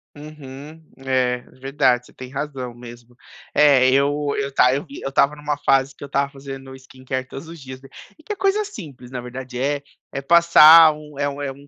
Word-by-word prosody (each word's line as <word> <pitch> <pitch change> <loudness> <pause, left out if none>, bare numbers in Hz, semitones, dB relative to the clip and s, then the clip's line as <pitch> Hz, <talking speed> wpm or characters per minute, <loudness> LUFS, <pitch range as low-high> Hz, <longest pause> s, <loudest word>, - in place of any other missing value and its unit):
Uhum. 150 0 -11 0.2
É, 130 -2 0 0.2
verdade, 130 -2 0
você - - -20
tem 130 -1 -10
razão 135 -3 -5
mesmo. 120 0 -13 0.4
É 135 -3 +5
eu 145 +1 0
eu 140 0 -3
tá 125 -1 +4
eu 140 - -4
vi 280 - -11
eu 135 - -4
estava 140 +2 +2
numa 150 0 -4
fase 135 0 +2
que - - -13
eu - - -5
estava 140 0 -2
fazendo 135 -1 -10
skincare 130 0 -7
todos 135 +4 -10
os 165 -1 -11
dias 130 -1 -10
be 135 - -16 0.3
e - - -16
que - - -8
é - - -2
coisa 390 +2 0
simples 150 - -11
na 130 - -6
verdade 125 0 -8
é 140 +1 -1 0.3
é 140 - -5
passar 165 0 +7
1, 150 -1 -13
é 145 0 -1
1 140 0 -6
é 140 -1 -3
1 140 +1 -15
140 Hz, 210 wpm, -21 LUFS, 130-150 Hz, 0.4 s, passar